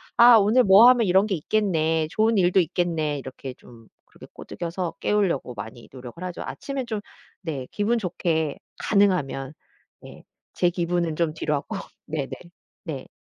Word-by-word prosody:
"아 240 0 +8
오늘 220 +5 +4
뭐 200 +4 +8
하면 245 -2 +5
이런 190 +3 +4
게 200 - 0
있겠네. 160 -3 0
좋은 220 +4 +1
일도 185 0 +4
있겠네." 165 -3 -1
이렇게 130 -1 -8
좀 115 -3 -17 0.2
그렇게 - - -15
꼬드겨서 175 0 -5
깨우려고 180 -12 0
많이 110 +3 -9
노력을 130 +6 -10
하죠. 180 -1 -5
아침에 275 -2 -5
좀 220 -3 -4 0.4
네 150 -8 -5
기분 215 +3 0
좋게 165 -6 -1 0.2
가능하면 180 -10 +1 0.5
예. - - -13 0.3
제 175 - +2
기분은 175 -2 -1
좀 165 -3 0
뒤로 155 -1 -2
하고. 140 - -3 0.3
네네. 150 -3 -4 0.5
네. 145 -6 -6
175 Hz, 305 characters per minute, -24 LUFS, 150-205 Hz, 0.5 s, 아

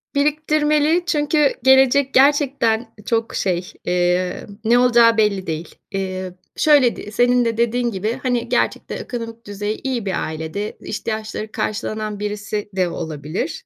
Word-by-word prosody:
Biriktirmeli 300 +2 +2
çünkü 295 -2 +2
gelecek 265 +1 +5
gerçekten 265 -5 +3
çok 230 -1 -1
şey, 180 -1 -1
emm, 180 +2 -1
ne 240 +2 +5
olacağı 235 -2 +5
belli 200 -3 +1
değil. 160 +1 -5 0.2
Eee, 185 -2 -4 0.2
şöyle 285 -6 +4
d 210 - -8
senin 245 +2 +3
de 230 -1 -1
dediğin 235 +1 +1
gibi, 215 +5 -2
hani, 245 -2 -1
gerçekte 240 - 0
ekonomik 230 -1 -6
düzeyi 205 +1 -4
iyi 250 -5 -2
bir 190 - -1
ailede 160 +6 -5
ihtiyaçları 215 0 -4
karşılanan 215 -1 -3
birisi 210 0 -4
de 185 -2 +1
olabilir. 160 0 -5
225 Hz, 130 wpm, -20 LUFS, 200-255 Hz, 0.2 s, gelecek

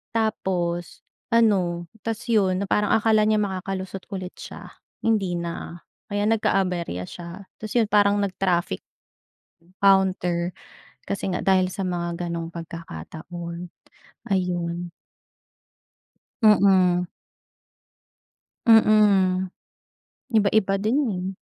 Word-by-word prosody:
Tapos 180 -6 -1 0.2
ano, 180 -7 +2
ta's 225 +2 -4
'yon 195 -3 +2
na - - -2
parang 210 0 +3
akala 215 -1 +3
niya 215 - +3
makakalusot 190 -2 -3
ulit 185 -1 -5
siya, - - -9 0.3
hindi 200 -6 +1
na 170 0 -6 0.2
kaya 205 0 -1
nagka-aberya 185 - 0
siya. 170 - -9 0.3
Ta's 215 +1 -7
'yon 225 -3 +2
parang 205 -1 +4
nag-traffic 180 - 0 1.0
counter 185 -3 +3 0.6
kasi 195 -1 -2
nga - - -2
dahil 185 -1 +2
sa 195 - -4
mga 175 -1 -3
gano'ng 170 0 -4
pagkakataon 170 - -7 0.7
ayun. 175 -2 -1 1.5
Mm. 190 -4 +5 1.6
Mm, 200 -5 +4 0.8
iba-iba 200 -1 +3
din, 215 +6 +1 0.2
eh. 185 +1 -4
185 Hz, 95 wpm, -24 LUFS, 175-205 Hz, 1.6 s, Mm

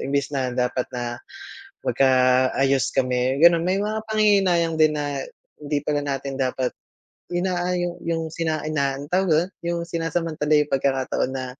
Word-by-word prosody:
Imbes 140 +1 -1
na 130 -2 -1
dapat 125 0 -1
na 120 -1 -4 0.7
magkaayos 130 0 +2
kami, 130 +1 0
gano'n. 170 0 +6
May 190 +2 +1
mga 215 +1 -2
panghihinayang 195 -6 +2
din 155 -1 +5
na, 145 -2 -3 0.3
hindi 145 0 -2
pala 150 0 -1
natin 135 -1 -3
dapat 130 -1 0 0.6
inaayo 175 0 -1
'yong 165 -1 -2
sina 160 -2 -1
inaa 140 -3 -1
tawag 185 +4 +1
mo - - +5
do'n? - - -15
'Yong 170 0 -2
sinasamantala 165 -2 -2
'yong 150 - +2
pagkakataon 135 -1 0
na, 130 - -3
150 Hz, 145 wpm, -23 LUFS, 135-170 Hz, 0.7 s, gano'n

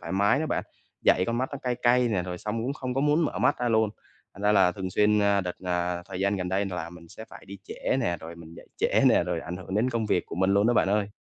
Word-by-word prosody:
thoải 85 - -6
mái 100 +6 +3
nữa 155 - -1
bạn, - - -2 0.4
dậy 90 - +4
con 115 0 -1
mắt 130 +1 -1
nó 140 - -4
cay 125 -1 -1
cay 125 0 +4
nè, 100 -5 0
rồi 90 0 -6
xong 110 +3 -3
cũng 130 +4 -2
không 130 -2 -5
có 135 - 0
muốn 150 +3 +2
mở - - -3
mắt - - +2
ra 120 - 0
luôn. 110 -2 +2 0.4
Thành 100 - -11
ra 105 - +3
là 95 -3 +4
thường 95 0 -5
xuyên, 105 +2 +3
a, 100 -1 +3
đợt, 90 -2 -4
à, 90 0 -1
thời 95 -1 -6
gian 100 +1 +1
gần 90 -1 -3
đây 95 +2 0
là 90 -3 -5
mình 85 -1 -14
sẽ 110 - -10
phải - - -12
đi 100 +1 -9
trễ - - -2
nè, 85 -8 0
rồi 80 +1 -9
mình 85 -1 -12
dậy - - -13
trễ - - +2
nè, - - +4
rồi 85 -2 -2
ảnh 90 +2 -6
hưởng 95 +1 -7
đến 115 +5 +1
công 115 -3 -1
việc 90 - 0
của - - -7
mình 95 +2 +1
luôn 100 +3 +3
á 120 - +3
bạn - - +3
ơi. 105 0 +1
100 Hz, 305 wpm, -26 LUFS, 90-115 Hz, 0.4 s, dậy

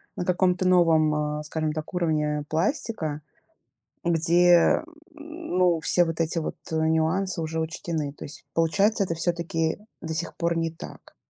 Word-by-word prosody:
на 180 - -3
каком-то 180 0 +2
новом, 165 -4 +4
а, 150 0 -2
скажем 155 0 -2
так, 155 +3 -6
уровне 150 -4 0
пластика, 160 - -1 0.8
где, 170 - +4 0.3
м, 315 - -6
ну, 175 -3 +3
все 175 - +3
вот 165 0 -4
эти 165 +1 0
вот, 160 - -4
а, - - -1
нюансы 165 +3 +1
уже 160 0 -3
учтены. 160 -2 -3
То - - -9
есть, 140 -1 -12
получается, 200 +6 +2
это 170 -3 -2
всё-таки 165 -1 -1 0.2
до 160 -1 -4
сих 165 +1 -3
пор 170 0 0
не 165 -1 -1
так. 165 - -12
165 Hz, 155 wpm, -25 LUFS, 160-180 Hz, 0.8 s, новом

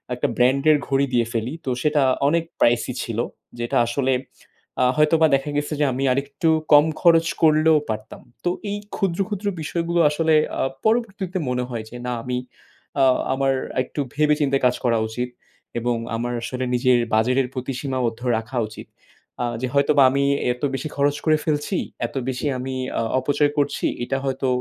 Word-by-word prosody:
একটা 125 - 0
brand 130 +3 +3
এর 150 - +5
ঘড়ি 135 0 +2
দিয়ে 120 -1 +3
ফেলি। 115 +3 -2
তো - - -1
সেটা 150 -1 +2 0.3
অনেক 165 +3 +2 0.2
pricey 120 +1 +2
ছিল। 115 -1 -4 0.4
যেটা 120 0 -1
আসলে 130 +2 0 0.7
আ - - +5
হয়তোবা 160 +1 +4
দেখা 135 +2 -2
গেছে 150 +1 -2
যে, 150 - +3
আমি 135 - -2
আরেকটু 140 +5 0 0.2
কম 145 +1 +8 0.2
খরচ 165 -1 +5 0.2
করলেও 155 0 +5
পারতাম। 110 0 -5 0.2
তো 175 - +3 0.2
এই 205 - -2 0.2
ক্ষুদ্র, 190 -4 -1
ক্ষুদ্র 205 -1 -4
বিষয়গুলো 170 +2 -1
আসলে 160 +2 +1 0.3
আ - - +1 0.2
পরবর্তীতে 205 -5 0
মনে 125 0 0
হয় 115 -3 -4
যে, 120 - -11
না 125 - -2
আমি 125 0 -2 0.6
আ - - +6 0.3
আমার 135 0 +1 0.2
আ - - -8
একটু 140 - -8
ভেবে 150 0 +3
চিন্তে 140 -1 +2
কাজ 125 0 +3
করা 115 -1 +3
উচিত। 125 +3 -3 0.5
এবং 120 0 0 0.2
আমার 120 +2 -2
আসলে 130 +1 -3
নিজের 125 0 +3
বাজেটের 125 +4 +2
প্রতি 130 +1 -4
সীমাবদ্ধ 125 -5 -2 0.2
রাখা 115 +3 -5
উচিত। 110 - -11 0.6
আ - - +1 0.2
যে 130 - 0
হয়তোবা 140 0 +4
আমি 140 +1 +1 0.3
এত 125 - -16
বেশি 135 +4 -4
খরচ 145 0 +2
করে 155 -1 +4
ফেলছি, 155 +4 0 0.3
এত - - -17
বেশি 125 0 -3
আমি 130 +1 -4 0.3
আ - - +1 0.2
অপচয় 145 +2 +1
করছি, 145 0 0 0.2
এটা 135 +2 -1
হয়তো 135 0 -1
135 Hz, 175 wpm, -22 LUFS, 125-155 Hz, 0.7 s, কম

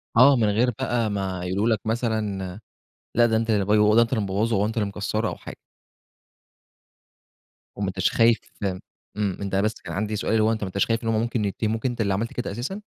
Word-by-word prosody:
آه، 135 +4 +7
من 110 -3 +2
غير 120 +4 +3
بقى 120 -4 0
ما 95 -3 -3
يقولوا 95 +5 0
لك - - -10
مثلًا 110 -5 -2 0.6
لأ، 120 0 +5
ده 110 -1 +1
أنت 115 0 0
اللي 100 -3 +2
بي 105 +2 +3
هو 105 - +5
ده - - +5
اللي 115 +2 +6
أنت 115 +2 0
مبوظه 105 +1 0
هو 100 +2 +2
أنت 115 - -4
اللي 105 -2 0
مكسرُة 105 +2 -2
أو - - -5
حاجة. - - -10 2.2
وما 100 -1 -2
انتش 95 0 0
خايف 115 0 +4 0.8
إمم، 100 -3 -1
أنت 100 -1 -2
بس 105 +3 +1
كان 85 - -7
عندي 105 +3 -2
سؤال، 105 - -2
اللي 110 -1 +3
هو 110 - +3
أنت 110 -2 -2
ما - - -2
انتش 100 +2 0
خايف 115 0 -1
إن - - -3
هُم 110 -1 +2
ممكن 115 -2 -1
يتهموك 110 +4 -2
أنت 120 -2 -1
اللي 100 -2 +1
عملت 115 +4 -2
كده 125 - -3
أساسًا؟ 120 - -4
110 Hz, 225 wpm, -24 LUFS, 100-115 Hz, 2.2 s, آه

